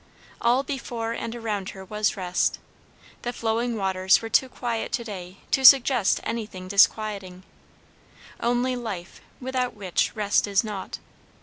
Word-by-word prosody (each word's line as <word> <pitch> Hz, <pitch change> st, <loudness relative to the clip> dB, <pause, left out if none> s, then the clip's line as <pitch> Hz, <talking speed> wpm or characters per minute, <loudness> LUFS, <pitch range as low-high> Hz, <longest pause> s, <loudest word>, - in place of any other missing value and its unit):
All 245 Hz, +3 st, +3 dB
before 240 Hz, -5 st, -4 dB
and 230 Hz, 0 st, -4 dB
around 210 Hz, -5 st, -3 dB
her 190 Hz, -, -9 dB
was 210 Hz, +2 st, -1 dB
rest; 180 Hz, -1 st, 0 dB, 0.6 s
the 240 Hz, -, -3 dB
flowing 230 Hz, 0 st, -1 dB
waters 190 Hz, -1 st, +3 dB
were 225 Hz, -, -6 dB
too 260 Hz, +3 st, +3 dB
quiet 235 Hz, -2 st, -3 dB
to 235 Hz, -, 0 dB
day 190 Hz, -4 st, -8 dB
to 270 Hz, -, +2 dB
suggest 260 Hz, -5 st, +6 dB
anything 210 Hz, -5 st, -5 dB
disquieting; 200 Hz, -2 st, +2 dB, 1.0 s
only 245 Hz, +2 st, +1 dB
life, 200 Hz, -8 st, -6 dB, 0.2 s
without 255 Hz, -1 st, -2 dB
which 190 Hz, -4 st, -1 dB
rest 205 Hz, -1 st, +2 dB
is 200 Hz, +1 st, +2 dB
nought. 210 Hz, -3 st, -5 dB
220 Hz, 135 wpm, -25 LUFS, 195-240 Hz, 1.0 s, suggest